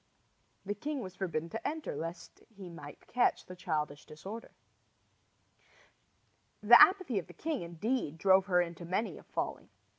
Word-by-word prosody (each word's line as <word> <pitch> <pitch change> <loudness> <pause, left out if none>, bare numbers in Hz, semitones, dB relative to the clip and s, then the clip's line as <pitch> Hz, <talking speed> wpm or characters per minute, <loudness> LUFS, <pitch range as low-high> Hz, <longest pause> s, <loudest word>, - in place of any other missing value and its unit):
The 205 - -1
king 285 +8 -4
was 185 -4 -8
forbidden 165 -4 -2
to 225 - -4
enter 315 0 -4
lest 165 +1 -7
he 195 -5 -11
might 145 -3 -11
catch 245 0 +1
the 185 - -9
childish 150 -4 -3
disorder. 195 +9 -8 2.1
The 240 +3 +9
apathy 370 - +5
of 175 - -9
the - - -13
king, 310 -4 -3
indeed, 170 - -2
drove 190 +2 +4
her 180 -2 +4
into 170 0 -8
many 185 +6 -2
a - - -15
folly. - - -4
190 Hz, 150 wpm, -32 LUFS, 170-230 Hz, 2.1 s, The